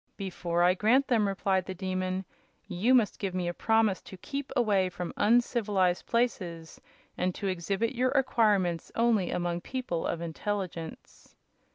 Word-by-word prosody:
"Before 175 Hz, -3 st, -1 dB
I 180 Hz, +1 st, +5 dB
grant 235 Hz, +8 st, +3 dB
them," 220 Hz, -5 st, +3 dB
replied 195 Hz, -1 st, 0 dB
the 190 Hz, -, -5 dB
Demon, 185 Hz, 0 st, -2 dB, 0.4 s
"you 210 Hz, +7 st, +2 dB
must 230 Hz, -5 st, +2 dB
give 190 Hz, -3 st, -3 dB
me 180 Hz, -1 st, -1 dB
a 175 Hz, -, -1 dB
promise 220 Hz, -1 st, +2 dB
to 190 Hz, -, -11 dB
keep 275 Hz, +8 st, -5 dB
away 205 Hz, -7 st, +2 dB
from 180 Hz, -1 st, -6 dB
uncivilized 210 Hz, -5 st, +2 dB
places 180 Hz, -9 st, -2 dB, 0.4 s
and 180 Hz, 0 st, 0 dB
to -, -, -5 dB
exhibit 195 Hz, +5 st, -1 dB
your 255 Hz, +1 st, +1 dB
acquirements 210 Hz, -, +1 dB
only 230 Hz, -5 st, +2 dB
among 175 Hz, 0 st, -2 dB
people 245 Hz, -8 st, -3 dB
of 170 Hz, -, -2 dB
intelligence." 170 Hz, 0 st, -5 dB
195 Hz, 150 wpm, -29 LUFS, 180-230 Hz, 0.4 s, I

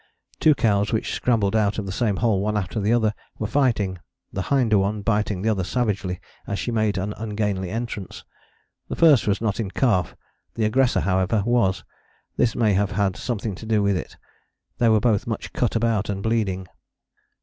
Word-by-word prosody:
Two 155 Hz, -2 st, +5 dB
cows, 100 Hz, -4 st, +1 dB
which 110 Hz, -, -1 dB
scrambled 110 Hz, -4 st, +1 dB
out 105 Hz, -1 st, +2 dB
of 105 Hz, -, -3 dB
the 95 Hz, -, -4 dB
same 105 Hz, 0 st, 0 dB
hole 110 Hz, -2 st, +1 dB
one 105 Hz, +1 st, 0 dB
after 105 Hz, +2 st, -2 dB
the 105 Hz, +2 st, +1 dB
other, 110 Hz, -3 st, +2 dB, 0.2 s
were 110 Hz, -, -3 dB
fighting, 110 Hz, -7 st, +1 dB, 0.3 s
the 95 Hz, -, -2 dB
hinder 115 Hz, -3 st, +2 dB
one 100 Hz, +2 st, -1 dB
biting 105 Hz, -3 st, 0 dB
the 110 Hz, -, +2 dB
other 100 Hz, -4 st, 0 dB
savagely 100 Hz, -4 st, -1 dB, 0.3 s
as 100 Hz, -, -2 dB
she 120 Hz, -, -3 dB
made 110 Hz, -3 st, +1 dB
an 100 Hz, +2 st, -2 dB
ungainly 105 Hz, -4 st, -2 dB
entrance. 110 Hz, -2 st, -5 dB, 0.6 s
The -, -, -3 dB
first 155 Hz, -9 st, +5 dB
was 105 Hz, +1 st, +1 dB
not 110 Hz, -2 st, -1 dB
in 105 Hz, -4 st, -2 dB
calf, 95 Hz, -, +1 dB, 0.4 s
the 110 Hz, -, 0 dB
aggressor, 125 Hz, +3 st, +2 dB
however, 95 Hz, +2 st, +1 dB
was: 120 Hz, -6 st, +1 dB, 0.5 s
this 115 Hz, -, +1 dB
may 110 Hz, -4 st, +2 dB
have 100 Hz, 0 st, +1 dB
had 100 Hz, -1 st, +1 dB
something 110 Hz, -3 st, -3 dB
to 95 Hz, -, -9 dB
do 110 Hz, -2 st, +2 dB
with 100 Hz, -1 st, +2 dB
it. -, -, -6 dB, 0.6 s
They 120 Hz, -2 st, +4 dB
were 110 Hz, -1 st, +5 dB
both 110 Hz, -2 st, +1 dB
much 115 Hz, -, -4 dB
cut 120 Hz, -, 0 dB
about 115 Hz, -3 st, +1 dB
and 100 Hz, -1 st, -3 dB
bleeding. 100 Hz, -5 st, -1 dB
105 Hz, 190 wpm, -23 LUFS, 100-115 Hz, 0.6 s, Two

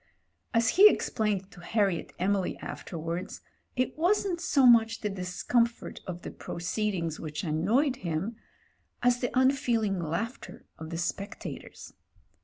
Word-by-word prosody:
As 230 Hz, -1 st, +3 dB
he 410 Hz, +3 st, +9 dB
explained 205 Hz, -, -1 dB
to -, -, -14 dB
Harriet 195 Hz, -2 st, 0 dB
Emily 195 Hz, +1 st, 0 dB
afterwards, 170 Hz, +1 st, -5 dB, 0.3 s
it 255 Hz, 0 st, 0 dB
wasn't 360 Hz, 0 st, +2 dB
so 275 Hz, -6 st, +3 dB
much 225 Hz, -2 st, +5 dB
the 210 Hz, -, -1 dB
discomfort 215 Hz, +6 st, -1 dB
of 175 Hz, -1 st, -6 dB
the -, -, -6 dB
proceeding 180 Hz, -1 st, -2 dB
which 150 Hz, -1 st, -5 dB
annoyed 215 Hz, -, +1 dB
him, 180 Hz, +5 st, -3 dB, 0.7 s
as 245 Hz, 0 st, +4 dB
the 245 Hz, -, -1 dB
unfeeling 240 Hz, -7 st, +2 dB
laughter 175 Hz, -, -4 dB
of 160 Hz, 0 st, -7 dB
the 165 Hz, -, -4 dB
spectators. 185 Hz, +4 st, -5 dB
210 Hz, 125 wpm, -29 LUFS, 175-245 Hz, 0.7 s, he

